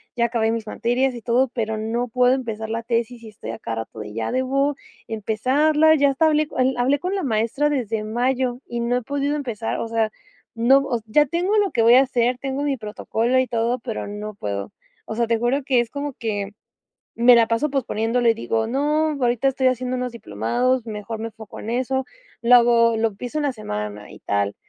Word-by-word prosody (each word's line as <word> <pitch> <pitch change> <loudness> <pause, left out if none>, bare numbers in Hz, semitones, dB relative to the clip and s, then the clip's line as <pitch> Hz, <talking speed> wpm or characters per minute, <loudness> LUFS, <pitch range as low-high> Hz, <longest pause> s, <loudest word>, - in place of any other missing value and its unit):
ya 235 -1 +2
acabé 225 -1 +1
mis 230 -1 -3
materias 245 +4 0
y 240 - -8
todo, 245 +4 +2
pero, 220 -3 -2
no 230 +3 -2
puedo 250 +2 +3
empezar 220 -4 -5
la 225 +1 -2
tesis 235 +1 -2
y 220 - -9
estoy 215 - -10
a - - -6
cada 115 - -4
rato 110 - -13
de 105 -1 -7
ya 110 0 -3
debo 275 +3 +1 0.3
empezarla, 270 +9 +2
ya 285 -2 +4
hasta 275 +4 +2
hablé 305 0 +2
el 260 0 +2
hablé 260 +4 +2
con 365 +6 -3
la 385 - -2
maestra 230 +4 +1
desde 230 -6 -1
mayo 245 +2 -1
y 240 - -4
no 235 +1 +1
he - - -2
podido 285 +2 -1
empezar. 235 -6 -3
O - - -3
sea, 225 -1 0 0.4
no, 240 +4 +5
o 245 -4 -1
se 215 - -23
ya 295 +7 +4
tengo 355 +8 0
lo 410 -2 +2
que 235 - +1
voy 230 +2 +7
a 260 - +8
hacer, 250 -2 +1
tengo 270 +1 -3
mi 285 -2 0
protocolo 225 +3 -1
y 255 - +1
todo, 235 +1 0
pero 230 -2 -5
no 210 0 -6
puedo. 100 - -4 0.3
O 220 - -5
sea, 235 +1 +1
te 230 0 0
juro 250 +4 0
que 260 -2 +2
es 235 -1 0
como 285 +2 -4
que, 205 -4 -3 0.6
me 240 +1 +6
la 230 -1 +4
paso 250 +6 0
posponiéndolo 240 -3 0
y 225 - +5
digo: 225 0 -1
"No, 300 +5 +1
ahorita 245 0 +2
estoy 260 -1 +2
haciendo 255 0 -1
unos 250 -1 -3
diplomados, 230 - -1
mejor 215 0 -5
me 225 +1 -4
enfoco 220 -2 -11
en 220 - -5
eso, 260 +2 -1 0.4
lo 240 +1 +6
hago 235 -1 +4
lo 225 0 +2
empiezo 240 +7 -6
en 300 - -1
la 280 - +1
semana 105 - -6
y - - -12
tal", 100 0 -1
240 Hz, 220 wpm, -22 LUFS, 220-265 Hz, 0.6 s, a